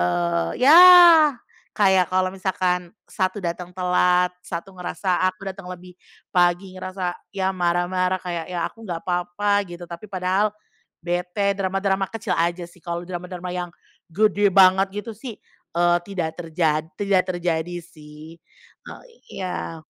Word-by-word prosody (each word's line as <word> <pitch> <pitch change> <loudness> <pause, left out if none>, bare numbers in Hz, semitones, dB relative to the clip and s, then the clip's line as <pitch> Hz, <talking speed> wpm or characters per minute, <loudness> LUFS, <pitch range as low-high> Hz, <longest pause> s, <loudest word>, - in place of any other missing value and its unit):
eee, 85 -1 0
ya 280 +5 +6 1.0
kayak 190 -4 +2
kalau 185 0 0
misalkan 180 -2 -1 0.2
1 185 0 -2
datang 175 -1 -5
telat, 180 0 +1
1 185 +3 -7
ngerasa 180 0 -2
aku 185 +1 -13
datang 185 -1 -10
lebih 180 0 -10 0.4
pagi 180 +1 +2
ngerasa, 185 -1 -4 0.2
ya 190 -1 -2
marah-marah 180 +1 0
kayak, 170 -3 -5
ya 175 -2 -2
aku 225 - -12
nggak 175 -6 -5
papa 180 +3 0
gitu, 175 0 -9
tapi 170 +4 -10
padahal 190 +3 0 0.5
bete, 180 +3 -1
drama-drama 195 0 -1
kecil 225 -2 -3
aja 170 +1 -1
sih 175 0 -21
kalau 170 0 -5
drama-drama 180 0 -6
yang 175 -1 -4 0.4
gede 205 +2 +2
banget 190 0 +5
gitu 230 - -7
sih, 225 +1 -9 0.4
eee, 175 0 +4
tidak 175 -4 -3
terjad 160 -2 0
tidak 200 -2 +2
terjadi 175 -1 -2
sih. 155 -1 -14 0.6
Oh, - - -11 0.3
iya. 175 -3 -5
180 Hz, 135 wpm, -22 LUFS, 175-190 Hz, 1.0 s, ya